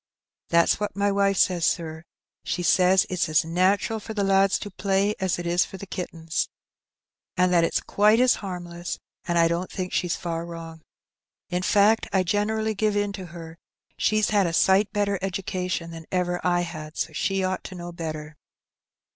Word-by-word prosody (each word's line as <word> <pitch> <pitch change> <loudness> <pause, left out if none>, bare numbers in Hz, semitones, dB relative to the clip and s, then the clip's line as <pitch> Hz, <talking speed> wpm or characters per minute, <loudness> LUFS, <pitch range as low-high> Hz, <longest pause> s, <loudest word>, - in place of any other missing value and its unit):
^' - - -47
"That's 170 +3 +3
what 210 - -3
my 200 0 +1
wife 195 -1 +2
says, 180 -3 +2
sir; 160 -1 -1 0.4
she 175 - -2
says 185 +1 +4
it's 180 -2 -1
as 155 0 +3
natural 190 +6 +1
for 220 +1 -8
the 205 - 0
lads 195 0 +3
to 205 - -7
play 200 +1 +1
as 190 -2 0
it 175 - -5
is 175 +1 +3
for 190 - -9
the 200 - -8
kittens, 165 -4 -3 0.9
and 180 0 +3
that 170 -1 +5
it's 165 - +1
quite 210 +2 +3
as 250 0 +5
harmless, 175 -3 -5 0.3
and 175 - 0
I 165 0 +5
don't 170 +2 -2
think 185 -1 -4
she's 175 -1 0
far 165 -1 -4
wrong. 165 -1 -9 0.7
In 180 0 -1
fact, 210 +4 +3
I 190 -1 +2
generally 215 +4 0
give 210 0 0
in 205 -1 0
to 190 -2 -7
her; 165 0 -10 0.4
she's 215 0 +1
had 200 -3 +3
a 165 - -3
sight 190 +4 +4
better 200 -2 0
education 185 -2 -3
than 165 -1 -10
ever 180 -1 0
I 175 -1 +2
had, 155 -2 -7
so - - -2
she 195 -1 0
ought 185 0 -2
to 185 - -7
know 175 0 -7
better." 155 -2 -6
185 Hz, 190 wpm, -25 LUFS, 170-200 Hz, 0.9 s, that